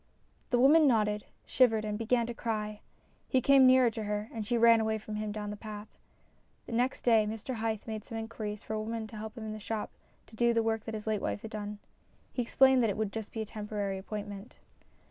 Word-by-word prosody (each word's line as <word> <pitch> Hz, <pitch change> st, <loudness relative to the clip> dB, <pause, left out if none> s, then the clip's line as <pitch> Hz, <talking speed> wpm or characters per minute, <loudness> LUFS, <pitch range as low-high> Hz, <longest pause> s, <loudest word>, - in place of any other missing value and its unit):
The 245 Hz, -, +2 dB
woman 295 Hz, +5 st, +6 dB
nodded, 210 Hz, -4 st, +2 dB, 0.2 s
shivered, 225 Hz, -4 st, +3 dB
and 210 Hz, -1 st, -2 dB
began 230 Hz, +2 st, +1 dB
to 240 Hz, -, -4 dB
cry. 215 Hz, -2 st, -3 dB, 0.5 s
He 260 Hz, -, +3 dB
came 270 Hz, 0 st, +6 dB
nearer 255 Hz, -2 st, +6 dB
to 220 Hz, -1 st, -5 dB
her, 210 Hz, +1 st, -3 dB
and 225 Hz, -2 st, -3 dB
she 235 Hz, +3 st, 0 dB
ran 230 Hz, 0 st, +6 dB
away 220 Hz, 0 st, 0 dB
from 215 Hz, 0 st, -8 dB
him 215 Hz, 0 st, -3 dB
down 210 Hz, 0 st, -4 dB
the -, -, -5 dB
path. 210 Hz, 0 st, -9 dB, 0.7 s
Next 245 Hz, +3 st, -1 dB
day 225 Hz, -3 st, +4 dB
Mr 225 Hz, +3 st, -5 dB
Hythe 220 Hz, -1 st, -2 dB
made 220 Hz, -2 st, -5 dB
some 225 Hz, -, -7 dB
inquiries 220 Hz, -2 st, -5 dB
for -, -, -5 dB
a 215 Hz, -, -1 dB
woman 225 Hz, +1 st, -4 dB
to 220 Hz, 0 st, -10 dB
help 220 Hz, +3 st, -7 dB
in 220 Hz, -1 st, -5 dB
the 215 Hz, -, -7 dB
shop 215 Hz, 0 st, -4 dB, 0.3 s
to 220 Hz, -, -16 dB
do 235 Hz, +1 st, +2 dB
the 230 Hz, -, +3 dB
work 225 Hz, -1 st, -1 dB
that 225 Hz, -, -4 dB
his 210 Hz, -, -6 dB
late 215 Hz, -2 st, 0 dB
wife -, -, -3 dB
had 220 Hz, -, -7 dB
done. 210 Hz, 0 st, -5 dB, 0.6 s
He 250 Hz, -, 0 dB
explained 265 Hz, +2 st, +4 dB
that 225 Hz, -, +2 dB
it 200 Hz, -, -2 dB
would 215 Hz, -2 st, -1 dB
be 225 Hz, -, -3 dB
just 220 Hz, +1 st, -9 dB
a 220 Hz, -, -2 dB
temporary 205 Hz, -2 st, -4 dB
appointment. 205 Hz, +1 st, -7 dB
220 Hz, 225 wpm, -31 LUFS, 210-230 Hz, 0.7 s, woman